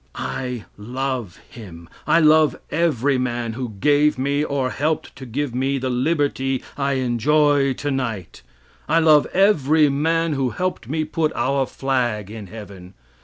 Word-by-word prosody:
I 125 -4 -4
love 125 -2 -4
him; 85 -8 -11 0.2
I 165 - +5
love 155 0 +4
every 145 -5 +1
man 120 -2 -2
who 125 +1 -4
gave 150 +2 +3
me, 140 +3 0
or 135 -3 -1
helped 155 +2 -2
to 130 0 -9
give 135 +2 -3
me 135 +2 0
the 130 -1 -2
liberty 135 -1 0
I 140 -1 0
enjoy 135 +3 +2
tonight; 130 - -4 0.5
I 160 - +3
love 155 -3 +5
every 160 -6 +3
man 165 +3 +1
who 135 -2 0
helped 180 -6 -3
me 155 +2 -1
put 155 0 -1
our 135 0 0
flag 120 -7 -2
in 110 -3 -8
heaven. 95 -3 -11
135 Hz, 145 wpm, -21 LUFS, 120-150 Hz, 0.5 s, I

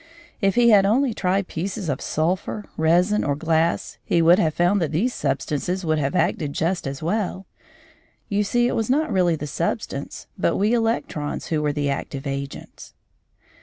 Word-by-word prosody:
If 195 -2 +2
he 235 -1 +5
had 200 -2 +7
only 235 +5 +2
tried 190 -1 0
pieces 185 +2 -4
of 140 -3 -2
sulphur, 180 +6 -1
resin, 175 +6 +2
or 145 - 0
glass, 165 +2 0
he - - +1
would 170 +3 +6
have 160 -5 +1
found 180 +3 +2
that 160 - -1
these 215 +11 0
substances 150 +6 -2
would 155 -1 +1
have 140 +4 -1
acted 155 -4 0
just 170 0 -1
as 135 +2 -5
well. 190 +1 -2 0.8
You 205 +1 +1
see 240 +4 +1
it - - -1
was 225 0 -1
not 305 +4 +1
really 175 -3 +3
the 150 - -5
substance, 145 - -4
but - - +1
we 210 +4 +2
electrons 225 -10 -1
who 155 -2 0
were 150 -1 +1
the 145 -1 -1
active 140 0 -5
agents. 140 0 -6
175 Hz, 175 wpm, -23 LUFS, 150-205 Hz, 0.8 s, had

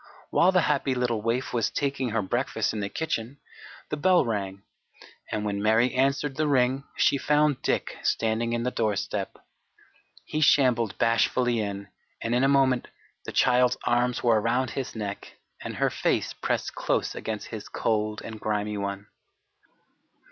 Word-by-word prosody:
While 180 - +4
the 180 -1 +4
happy 140 -4 +1
little 120 -3 0
waif 115 +4 -1
was 115 -3 +1
taking 140 -3 -1
her 110 -1 0
breakfast 95 - -1
in 110 - -3
the 100 -1 -2
kitchen 135 -1 -3 0.5
the 150 - -2
bell 180 0 +4
rang, 100 -3 -3 0.7
and 105 0 -2
when 100 -1 -2
Mary 110 +4 +3
answered 135 +1 +1
the 155 0 +1
ring 135 0 +2
she 140 - +3
found 150 -2 +2
Dick - - -1
standing 115 +1 0
in 120 0 -1
the 125 - -1
doorstep. 105 -5 -2 0.9
He 155 - -2
shambled 125 -7 +3
bashfully 115 +1 +2
in, 100 -1 -4 0.3
and 115 - -2
in 125 +2 +2
a - - +5
moment 135 -3 +3 0.4
the - - -5
child's 125 0 +3
arms 120 0 +1
were 115 -3 +4
around 120 +2 0
his 135 -3 -4
neck 100 -2 -6 0.2
and - - -6
her - - +1
face - - 0
pressed - - -2
close - - -1
against - - -5
his - - -7
cold 110 -1 -1
and 110 -1 -7
grimy 105 -1 -2
one. 100 0 -4
120 Hz, 160 wpm, -26 LUFS, 110-135 Hz, 0.9 s, a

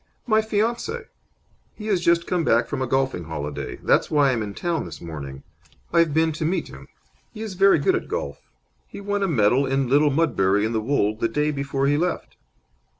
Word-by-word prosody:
"My 220 -2 +3
fiance. 235 - -1 0.7
He 215 - -9
has 200 -5 +1
just 170 0 +3
come 180 -2 0
back 120 -4 +3
from 130 - -4
a 130 - -1
golfing 135 -9 0
holiday. 75 -3 -5
That's - - +3
why 145 -3 +3
I'm 120 -3 -1
in 100 -2 -5
town 170 -3 -2
this - - -9
morning. 70 -5 -8 0.5
I've 170 -2 +4
been 160 +2 +2
to 155 +1 -4
meet 170 +2 -1
him. 65 +1 -12 0.5
He 220 - -5
is 215 -3 -5
very 195 0 +5
good 140 - +2
at - - -2
golf. 70 0 -5 0.4
He - - -10
won 205 0 -2
a 195 - +2
medal 130 - +3
at 135 - +2
Little 140 +3 +3
Mudbury 110 -10 +2
in 110 - -2
the 110 - 0
Wold 110 -4 0
the 115 - +1
day 150 +5 0
before 140 -1 -2
he 145 +1 +2
left." 175 +2 -2
145 Hz, 205 wpm, -23 LUFS, 110-175 Hz, 0.7 s, very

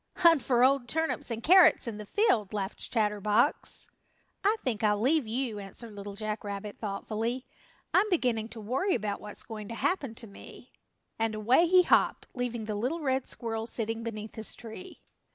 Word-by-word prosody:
"Hunt 335 -5 +5
for 245 -2 +2
old 265 -1 +3
turnips 320 -3 0
and 230 0 -4
carrots 350 -6 +6
in 215 -2 -5
the 210 - -8
field," 225 - +2
laughed 200 -1 -4
Chatterbox. 210 +3 +1 0.5
"I 410 +3 +4
think 230 -4 -2
I'll 210 -1 +3
leave 270 +2 +2
you," 230 -2 -2
answered 210 +3 -8
Little 200 0 -8
Jack 215 0 -4
Rabbit 205 0 -6
thoughtfully, 225 +4 -3 0.5
"I'm 410 +3 +4
beginning 245 - 0
to 230 - -8
worry 260 - 0
about 205 -1 -3
what's 210 -1 -5
going 215 -2 -7
to 230 - -6
happen 275 -6 -1
to 230 - -5
me," 200 - -13 0.5
and 225 -1 0
away 245 +11 +4
he 365 +1 +6
hopped, - - +3
leaving 240 -3 -3
the 215 - -3
little 255 +11 -2
red 265 -2 0
squirrel 225 -2 -2
sitting 225 -1 -2
beneath 220 -2 -6
his 220 -1 -5
tree. 340 +11 -10
230 Hz, 175 wpm, -29 LUFS, 210-270 Hz, 0.5 s, carrots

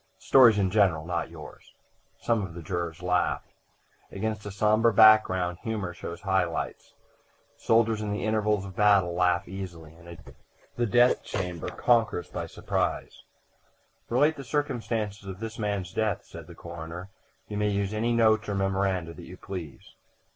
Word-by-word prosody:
"Stories 120 -5 +6
in 95 -2 +1
general 90 -7 +2
not 85 -1 -2
yours." - - -13 0.4
Some 115 -2 +1
of 85 -3 -7
the 85 - -8
jurors 85 0 -4
laughed. 90 0 0 0.6
Against 110 +1 -3
a - - -5
sombre 110 +3 +3
background 95 -5 +5
humor 105 -6 -3
shows 85 0 -8
high 95 -3 +2
lights. 85 - -6 0.6
Soldiers 115 -1 +2
in 105 -1 -3
the 105 - -3
intervals 105 -2 +1
of 95 -1 -9
battle 100 -4 +4
laugh 90 +1 +1
easily, 85 -5 -8
and 85 +1 -17
a 85 - -9
jest - - -17
in - - -16 0.4
the 120 - +1
death 120 +3 +4
chamber 90 -4 -4
conquers 115 +1 +1
by - - -4
surprise. - - -3 0.9
"Relate 145 +6 +3
the 140 - -7
circumstances 115 -8 -3
of 95 0 -7
this 115 0 -6
man's 100 -4 -2
death," 105 -3 -1
said 85 -2 -11
the 85 - -12
coroner. 85 +2 -8 0.4
"You 105 - -5
may 105 0 +1
use 100 0 -1
any 115 +2 0
notes 110 -2 +3
or 100 - -1
memoranda 95 -3 -1
that - - -11
you - - -10
please." 90 -7 -8
100 Hz, 165 wpm, -27 LUFS, 90-110 Hz, 0.9 s, Stories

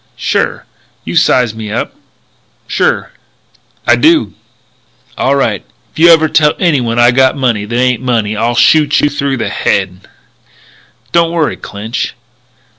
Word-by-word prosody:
"Sure." - - -2 0.4
"You - - -5
size 125 -4 +2
me 110 -2 -7
up?" 115 - -3 0.9
"I - - -3
do." 320 0 +2 0.8
"All - - 0
right. - - -1 0.3
If - - -12
you 170 +1 +6
ever 160 -1 +5
tell 150 0 +2
anyone 130 -10 0
I 120 0 +5
got 130 +2 +2
money 120 -6 -1
that 120 +3 -4
ain't 125 -1 +1
money 115 -4 -1
I'll 115 +3 -1
shoot 150 +3 +3
you 145 - +1
through 140 -1 -2
the 110 -3 -3
head." 95 -2 -2 1.0
"Don't 170 -1 +2
worry, 160 -7 -1
Clinch." 105 +3 -5
125 Hz, 135 wpm, -12 LUFS, 110-150 Hz, 1.0 s, you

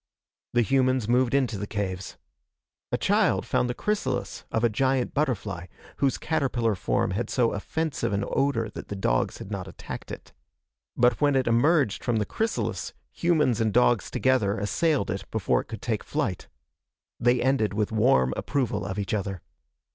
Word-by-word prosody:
The 120 0 +4
humans 130 -2 +2
moved 125 +2 +3
into 125 -7 +1
the 105 - -4
caves. 95 -3 -4 0.7
A - - +1
child - - +2
found 125 - +1
the 120 - -2
chrysalis 130 -12 -2
of 110 - 0
a - - +6
giant 130 +3 +1
butterfly, 105 - -1 0.3
whose 135 -2 +1
caterpillar 130 -8 0
form 95 - 0
had 105 +6 -2
so 120 -3 +2
offensive 140 +2 -2
an 100 0 0
odor 135 -5 +1
that - - -8
the 100 - -5
dogs - - 0
had 100 - -9
not 95 -2 -4
attacked 95 - -8
it. - - -9 0.6
But 120 -2 +3
when 145 -1 +4
it 130 -1 +2
emerged 120 - +2
from 120 - 0
the 105 -1 +1
chrysalis, 225 - -2 0.2
humans 150 -9 +2
and 110 -1 +2
dogs 120 -3 +3
together 125 -7 +1
assailed 135 - +1
it - - -5
before - - +1
it - - -15
could - - -8
take - - -1
flight. - - -2 0.7
They 120 +1 +3
ended 120 -6 +1
with 105 0 0
warm 65 - +3
approval 135 -7 -1
of 95 0 -4
each 105 +3 -2
other. 100 -3 -3
120 Hz, 170 wpm, -26 LUFS, 100-135 Hz, 0.7 s, a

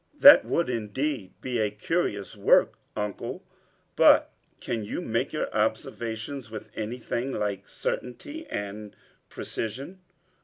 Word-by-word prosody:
"That 285 -1 +10
would 170 - +1
indeed 115 -1 -2
be 125 -2 -2
a 105 -1 +2
curious 105 - -2
work, 100 - +4 0.2
Uncle; 105 -2 -4 0.5
but - - +6 0.3
can 115 -2 -3
you 105 - -4
make - - -1
your - - -1
observations 115 +2 -2
with 110 -1 -8
anything 120 +3 -3
like 100 -4 -2
certainty 290 - -4
and 105 +1 -5 0.3
precision?" 135 - -5
115 Hz, 115 wpm, -27 LUFS, 105-135 Hz, 0.5 s, That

